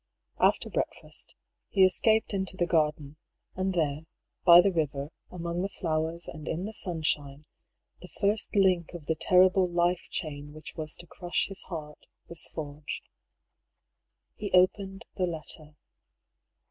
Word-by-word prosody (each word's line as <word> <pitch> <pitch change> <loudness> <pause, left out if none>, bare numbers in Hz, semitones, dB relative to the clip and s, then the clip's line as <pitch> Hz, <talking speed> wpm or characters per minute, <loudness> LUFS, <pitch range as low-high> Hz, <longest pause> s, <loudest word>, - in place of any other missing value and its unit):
After - - +3
breakfast, - - -4 0.3
he 190 -2 +5
escaped 220 +4 +4
into 190 -1 -1
the 175 - +2
garden; 150 -3 0 0.4
and 185 0 -1
there, 155 -1 -1 0.4
by 170 -1 +9
the 195 +2 +4
river, 150 -3 -2 0.2
among 170 0 -4
the 195 - -2
iBiowers 160 0 -2
and 155 -1 -9
in 175 +4 -2
the 220 - -6
sunshine, 150 -6 0 0.6
the 180 - -10
first 210 +1 +1
link 185 -4 +3
of 165 -4 -9
the 160 - +1
terrible 180 +3 +4
life 175 +1 0
chain 145 -1 -5
which 155 0 -10
was 155 -2 +4
to 175 - -12
crush 175 +2 -2
his 195 - 0
heart 150 -4 -8 0.2
was 170 - +2
forged. 145 -1 -7 1.2
He 205 - -5
opened 195 +1 +2
the 185 -2 +1
letter. 155 -2 -4
170 Hz, 140 wpm, -28 LUFS, 155-185 Hz, 1.2 s, by